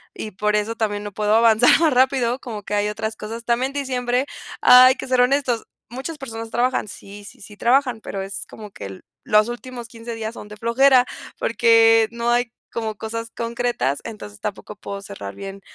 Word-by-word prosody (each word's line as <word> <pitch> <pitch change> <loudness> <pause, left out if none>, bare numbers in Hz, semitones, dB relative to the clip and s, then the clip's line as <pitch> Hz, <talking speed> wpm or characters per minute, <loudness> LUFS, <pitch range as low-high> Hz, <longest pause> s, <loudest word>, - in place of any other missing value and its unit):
y 215 - -6
por 210 +2 0
eso 210 +2 -1
también 205 -2 -2
no 205 - -6
puedo 210 +1 +1
avanzar 230 +3 +5
más 320 -3 +3
rápido, 255 -1 +2
como 220 -6 -7
que 210 - -6
hay 205 0 +1
otras 220 +1 -4
cosas 225 +2 -7
también 245 +3 +1
diciembre, 255 -2 -1 0.4
hay 255 +1 +8
que - - -7
ser 255 -1 +3
honestos, 250 -2 +1 0.2
muchas 265 +7 -6
personas 225 -5 -7
trabajan. 245 0 0
Sí, 200 +1 -11
sí, 205 - -14
sí 210 +1 -12
trabajan, 250 0 +2
pero 195 - -5
es 195 +1 -6
como 210 -2 -10
que 100 - -9
el 95 -1 -9 0.2
los 215 +1 +4
últimos 240 0 -7
15 230 0 -8
días 220 0 -5
son 210 - -10
de 210 0 -11
flojera, 250 +3 +4 0.3
porque 225 -1 +4
no 235 0 -1
hay 240 -1 +1 0.2
como 220 -2 -3
cosas 230 +2 -5
concretas. 235 - -1
Entonces, 105 - -9
tampoco 210 +1 -6
puedo 200 0 -7
cerrar 100 - -8
bien, 195 0 -8
230 Hz, 190 wpm, -22 LUFS, 210-245 Hz, 0.4 s, hay